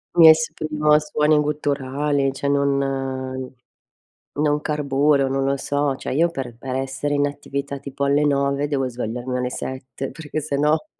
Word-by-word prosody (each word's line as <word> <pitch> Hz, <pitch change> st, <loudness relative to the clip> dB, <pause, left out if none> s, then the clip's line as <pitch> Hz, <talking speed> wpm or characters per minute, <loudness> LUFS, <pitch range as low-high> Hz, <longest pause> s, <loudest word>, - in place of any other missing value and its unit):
Mi 165 Hz, -2 st, +9 dB
esprimo 155 Hz, -1 st, +2 dB
a 150 Hz, -, +7 dB
suoni 150 Hz, 0 st, +2 dB
gutturali, 145 Hz, -1 st, 0 dB
cioè, 140 Hz, +1 st, -3 dB
non 135 Hz, -2 st, -1 dB, 0.8 s
non 150 Hz, 0 st, +1 dB
carburo, 145 Hz, -2 st, +2 dB
non 135 Hz, 0 st, 0 dB
lo 140 Hz, 0 st, +1 dB
so. 145 Hz, 0 st, 0 dB
Cioè, -, -, -5 dB
io 165 Hz, +5 st, +3 dB
per 125 Hz, -6 st, -6 dB
per 130 Hz, 0 st, -5 dB
essere 135 Hz, +2 st, -2 dB
in 145 Hz, 0 st, +2 dB
attività, 140 Hz, -1 st, -5 dB
tipo 140 Hz, 0 st, -4 dB
alle 140 Hz, +1 st, +3 dB
9, 140 Hz, 0 st, +1 dB
devo 135 Hz, -3 st, 0 dB
svegliarmi 125 Hz, +1 st, -4 dB
alle 125 Hz, 0 st, -1 dB
7, 130 Hz, +1 st, -5 dB
perchè 155 Hz, +2 st, -5 dB
se 140 Hz, -1 st, -2 dB
no 150 Hz, -, +2 dB
140 Hz, 160 wpm, -22 LUFS, 135-150 Hz, 0.8 s, Mi